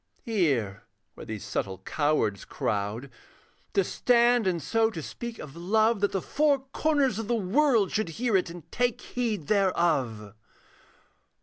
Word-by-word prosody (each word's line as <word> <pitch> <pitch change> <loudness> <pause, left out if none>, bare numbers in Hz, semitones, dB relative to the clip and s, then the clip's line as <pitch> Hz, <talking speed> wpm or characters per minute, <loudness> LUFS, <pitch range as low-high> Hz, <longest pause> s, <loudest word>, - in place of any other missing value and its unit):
Here, 140 - 0 0.3
where - - -11
these 110 -2 -6
subtle 95 -1 -3
cowards 110 - 0
crowd, 105 +6 -3 0.6
To 195 - +4
stand 240 +1 +3
and 175 -2 +1
so 220 +9 +1
to 205 - -7
speak 235 +9 -7
of 150 -1 -9
love, 215 +6 +2
That 205 0 +1
the 195 - -2
four 290 -2 +2
corners 285 -8 +1
of 225 - -4
the 240 - +1
world 225 0 +2
Should 215 -5 -1
hear 225 +6 -1
it 185 -2 +2
and 170 -1 -9
take 245 -1 0
heed 225 -10 -3
thereof. 155 - +1
195 Hz, 145 wpm, -27 LUFS, 145-235 Hz, 0.6 s, To